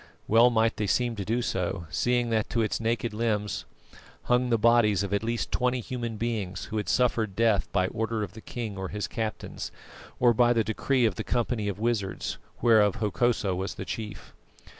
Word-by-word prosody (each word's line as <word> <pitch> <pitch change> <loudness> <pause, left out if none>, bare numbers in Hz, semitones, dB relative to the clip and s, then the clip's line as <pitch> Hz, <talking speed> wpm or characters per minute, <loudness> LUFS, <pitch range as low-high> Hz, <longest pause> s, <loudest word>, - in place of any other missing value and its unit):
Well 115 +3 +6
might 115 -1 +2
they 105 - -1
seem 120 +3 +1
to 100 - -2
do 115 +5 0
so, 90 -5 -2
seeing 120 -1 +1
that 110 -2 +1
to 115 -1 +1
its 105 - -1
naked 115 0 -1
limbs 105 -2 -1 0.6
hung 125 0 +2
the 115 - +3
bodies 110 -3 +4
of 100 0 -3
at 100 - +1
least 115 +1 -2
twenty 125 0 +1
human 120 -2 -4
beings 105 -5 -3
who 110 - -4
had 105 - -2
suffered 115 -5 +1
death 110 -3 +2
by 95 -1 +2
order 110 0 -2
of 100 - -6
the 110 - -10
king 110 -5 -5
or 95 - -3
his 105 0 -3
captains, 110 +3 -4 0.5
or 120 -1 +5
by 120 +1 +4
the 115 -2 +2
decree 120 +4 +1
of 105 -5 0
the - - -2
company 120 -3 -1
of 100 - -2
wizards, 110 -3 -2 0.2
whereof 110 -4 +5
Hokosa 105 -1 +1
was 95 +2 -3
the - - -6
chief. 110 -2 -6
110 Hz, 195 wpm, -27 LUFS, 105-120 Hz, 0.6 s, Well